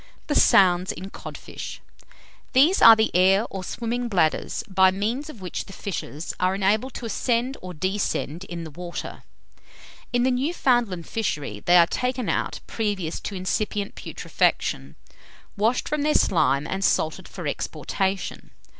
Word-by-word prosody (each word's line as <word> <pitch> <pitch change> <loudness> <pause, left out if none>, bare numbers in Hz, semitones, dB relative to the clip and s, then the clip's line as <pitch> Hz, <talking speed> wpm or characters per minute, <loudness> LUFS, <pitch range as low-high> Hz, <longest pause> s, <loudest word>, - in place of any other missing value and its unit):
THE 295 - -1
SOUNDS 185 -8 +5
IN 190 +4 -8
CODFISH. - - -8 0.7
These 295 +9 +5
are 230 0 +10
the 220 -3 0
air 190 +4 +5
or 190 -1 -5
swimming 240 +4 -3
bladders, 175 -8 0
by 190 -1 +5
means 225 +10 -2
of 235 -10 -11
which 180 - -4
the 195 - -12
fishes 170 -6 -5
are 185 +1 +2
enabled 210 +6 +1
to - - -6
ascend 240 +3 0
or 185 - -7
descend 185 -2 -2
in 170 -2 -6
the 160 - -8
water. 175 +3 -7 0.9
In 245 0 +2
the 260 - +3
Newfoundland 245 - +1
fishery 150 - -3
they 175 +10 +4
are 170 - +7
taken 250 +4 -2
out - - -1
previous 205 -7 -2
to 200 - -6
incipient 200 +2 -2
putrefaction, - - -1 0.6
washed 225 +4 +1
from 300 -1 -1
their 300 +1 +1
slime 145 -5 +3
and 190 +4 -3
salted 160 -4 +1
for - - -8
exportation. 190 -1 -3
195 Hz, 145 wpm, -24 LUFS, 180-240 Hz, 0.9 s, are